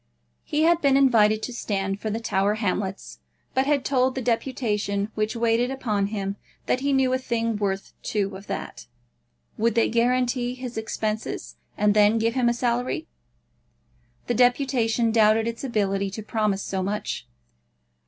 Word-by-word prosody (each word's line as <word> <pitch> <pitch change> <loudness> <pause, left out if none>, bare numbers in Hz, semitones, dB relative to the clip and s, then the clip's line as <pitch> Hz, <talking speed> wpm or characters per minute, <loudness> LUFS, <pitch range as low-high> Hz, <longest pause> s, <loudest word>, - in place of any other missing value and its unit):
He 300 +1 0
had 340 +1 +4
been 275 -1 +4
invited 220 -5 +4
to 250 - -4
stand 195 -4 -2
for 215 - -3
the 220 +2 -2
Tower 205 -2 +1
Hamlets, 190 - -3 0.3
but 265 +1 +1
had 285 -3 +1
told 260 -1 +2
the 265 - -2
deputation 220 -4 -1
which 215 +2 -1
waited 235 +1 +2
upon 215 -7 -1
him 200 -1 -3 0.3
that 255 - +1
he 280 +2 0
knew 265 -1 +2
a 260 - +1
thing 230 -3 -1
worth 195 -2 -2
two 200 -2 -2
of 195 +2 -11
that. - - -6 0.7
Would 230 0 +2
they 230 - +3
guarantee 245 +1 +1
his 250 -1 -7
expenses, 220 -1 -3 0.2
and 210 0 +3
then 210 +1 +5
give 225 +1 +1
him 250 -2 +2
a - - +2
salary? 245 +1 -1 1.2
The - - 0
deputation 245 -2 +2
doubted 220 0 +4
its 230 +2 -4
ability 200 -5 0
to 210 +3 -7
promise 210 -2 0
so 190 -1 -2
much. 205 +3 -3
225 Hz, 160 wpm, -25 LUFS, 205-250 Hz, 1.2 s, then